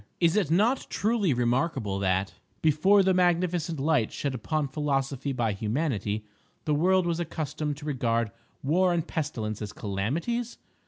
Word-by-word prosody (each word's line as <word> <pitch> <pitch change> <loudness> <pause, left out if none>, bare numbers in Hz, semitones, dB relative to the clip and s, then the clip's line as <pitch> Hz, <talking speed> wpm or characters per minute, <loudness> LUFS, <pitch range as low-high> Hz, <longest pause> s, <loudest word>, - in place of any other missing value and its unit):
Is 170 0 +3
it 200 -8 +2
not 215 +10 +2
truly 210 -5 +1
remarkable 125 -4 0
that, 95 0 0 0.3
before 175 +7 +5
the 190 0 +3
magnificent 175 -3 +1
light 145 -5 +2
shed 140 -2 -3
upon 145 +5 -1
philosophy 140 -1 -1
by 120 -5 0
Humanity, 110 -2 -2 0.4
the 150 - +1
world 185 +4 +3
was 170 -1 0
accustomed 155 -3 -3
to 150 - -10
regard 115 -6 0 0.3
War 175 +6 +3
and 170 -1 -1
Pestilence 110 - -3
as 105 -1 -5
calamities? 160 - -2
150 Hz, 145 wpm, -27 LUFS, 120-175 Hz, 0.4 s, before